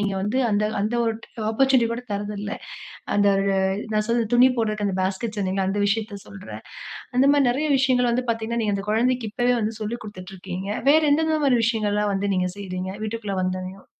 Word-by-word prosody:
நீங்க 200 -1 0
வந்து 235 +6 0
அந்த 210 0 +2 0.2
அந்த 215 +4 -1
ஒரு 225 -1 0 0.4
ஆப்பர்ச்சுனிட்டி 260 0 +3
கூட 245 +1 -5
தரதில்ல. 205 0 -4 0.7
அந்த 205 0 +4 0.7
நான் 215 0 +1
சொன்னது 235 -1 +1
துணி 255 +2 +6
போடுறதுக்கு 215 -2 0
அந்த 185 - -2
பாஸ்கெட்ஸ் 210 +3 -2
சொன்னீங்கள 190 0 0
அந்த 205 +1 -1
விஷயத்த 210 -1 -2
சொல்றேன். 200 -1 -9 0.5
அந்த 260 - +5
மாதிரி 280 -3 +4
நெறைய 300 +5 -1
விஷயங்கள் 255 -2 +3
வந்து 250 +1 0
பார்த்தீங்கன்னா, 230 +1 -2
நீங்க 210 -2 0
அந்த 195 +1 -6
கொழந்தைக்கு 240 +1 +1
இப்போவே 245 +2 +2
வந்து 220 +1 -1
சொல்லிக் 225 +3 -4
குடுத்துட்டு 190 -2 -9
இருக்கீங்க. 185 +1 -6 0.2
வேற 315 +2 +6
எந்தெந்த 315 +1 +2
மாரி 260 -3 +4
விஷயங்கள்லாம் 210 -2 +1
வந்து 200 +1 -1
நீங்க 180 0 0
செய்றீங்க 185 -1 -4
வீட்டுக்குள்ள 215 -3 -3
வந்தோனையும்? 185 +1 -4
215 Hz, 180 wpm, -23 LUFS, 200-240 Hz, 0.7 s, துணி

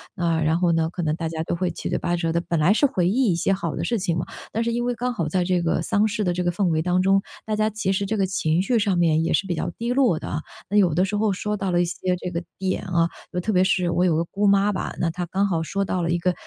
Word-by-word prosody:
啊， 165 -2 0
然 160 +2 +2
后 175 -2 +3
呢， 165 0 +1
可 175 0 -4
能 155 -1 0
大 165 -1 -3
家 160 0 -3
都 170 - -2
会 180 +1 -1
七 - - -5
嘴 - - 0
八 175 - -1
舌 165 -1 -1
的 170 - +1
本 170 -1 -1
来 155 +5 +4
是 285 - +3
回 185 -11 +1
忆 235 +1 +2
一 - - +1
些 170 +3 0
好 170 -4 -3
的 165 - -3
事 230 +5 0
情 175 -3 -1
嘛， 170 - -2 0.3
但 225 - -1
是 235 - 0
因 240 +1 -1
为 245 - 0
刚 250 +2 -2
好 170 -9 -2
在 180 +4 0
这 180 0 +1
个 165 -1 0
丧 205 +5 +2
事 210 0 -2
的 180 - +1
这 180 - -1
个 175 - +1
氛 195 +2 -1
围 160 -2 +1
当 180 +2 +1
中， 195 +1 +3 0.2
大 215 -1 -1
家 215 0 +1
其 210 -2 -2
实 195 +1 0
这 220 +3 -1
个 195 - +2
情 175 -3 0
绪 240 +5 +1
上 200 -4 +1
面 160 -2 +3
也 - - 0
是 - - +1
比 175 - -1
较 - - -2
低 235 +1 -2
落 245 - +3
的 - - -7
啊。 150 - -3 0.3
那 205 - +1
有 185 -6 +4
的 180 +4 +2
时 205 +2 -2
候 210 -1 +1
说 210 +2 -2
到 195 -2 -2
了 175 0 +3
一 - - +2
些 180 +1 -1
这 180 - -5
个 170 0 -3
点 190 0 -2
啊 170 -2 +1 0.2
就 180 - -1
特 215 +5 -1
别 185 -1 +4
是 185 -2 +1
我 175 +1 +2
有 170 -3 +2
个 165 - +1
姑 200 +4 0
妈 200 +1 +4
吧， 195 - -3
那 170 - +1
她 175 +2 -4
刚 190 +4 0
好 170 -4 0
说 195 +4 -2
到 185 -1 -1
了 165 - -1
一 175 - +1
个， 180 +1 +1
180 Hz, 350 characters per minute, -23 LUFS, 170-200 Hz, 0.3 s, 来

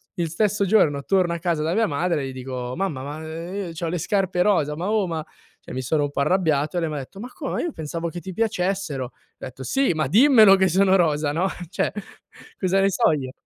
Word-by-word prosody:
Il 170 -2 -2
stesso 205 +4 +1
giorno 150 -9 +3
torno 185 -3 +2
a 170 - -4
casa 165 -3 -1
da 160 +2 0
mia 225 +2 +2
madre 160 +1 0
e 135 - -3
gli 130 - -8
dico: 125 -1 -5
"Mamma, 165 -9 -2
ma, 145 +2 -6
ehm, 170 +4 -5
i - - -10
c'ho 165 0 -3
le 180 - -2
scarpe 185 +1 0
rosa, 165 -7 +2
ma, 180 +5 -2
oh, 215 -3 +1
ma" 160 -2 -4 0.4
cioè - - -11
mi 130 - -3
sono 145 +4 0
un 145 - -2
po' - - -4
arrabbiato 155 -3 +1
e - - +1
lei 165 - -1
m'ha 150 - -4
detto: 140 +8 -8
"Ma 245 - -7
come? 295 -6 -3
Io 345 - -2
pensavo 165 - -4
che 175 - -7
ti 185 +1 -8
piacessero?" 190 - -1
Ho 125 - -11 0.3
detto: 130 +1 -8
"Sì, 265 - +1
ma 155 -3 -1
dimmelo 220 - +7
che 190 0 +3
sono 190 +2 +3
rosa, 150 -4 +1
no, 175 +5 0 0.2
cioè 185 - -1 0.7
cosa 190 0 +2
ne 195 - +3
so 170 - +3
io?" 130 -4 -4
170 Hz, 240 wpm, -23 LUFS, 150-195 Hz, 0.7 s, dimmelo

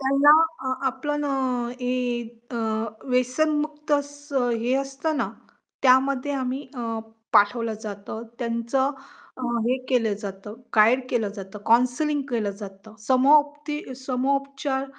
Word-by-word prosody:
त्यांना 275 +2 +5 0.4
अ, 260 - +1
आपलं 295 +3 -1
न - - -2 0.6
हे 245 -1 -1 0.3
अ, 240 - -4 0.5
व्यसनमुक्त 300 +4 0
असं 285 -2 0
हे 245 +2 +1
असतं 275 +3 -1
ना, - - 0 0.5
त्यामध्ये 265 +1 +4
आम्ही 265 0 -2
अ, 230 -2 -3 0.3
पाठवलं 220 +2 +4
जातं. 210 +1 -6 0.2
त्यांचं 235 +3 0 0.5
अ, 255 - -8 0.2
हे 255 +2 +2
केलं 230 -5 +2
जातं, 200 +1 -7 0.2
गाईड 245 +4 +5
केलं 225 -4 +1
जातं, 195 +1 -8
काउन्सलिंग 250 +5 +3
केलं 220 -4 0
जातं. 200 +2 -10
समपदे 295 +1 +3
समोपचार 275 +1 -1
255 Hz, 115 wpm, -25 LUFS, 235-285 Hz, 0.6 s, त्यांना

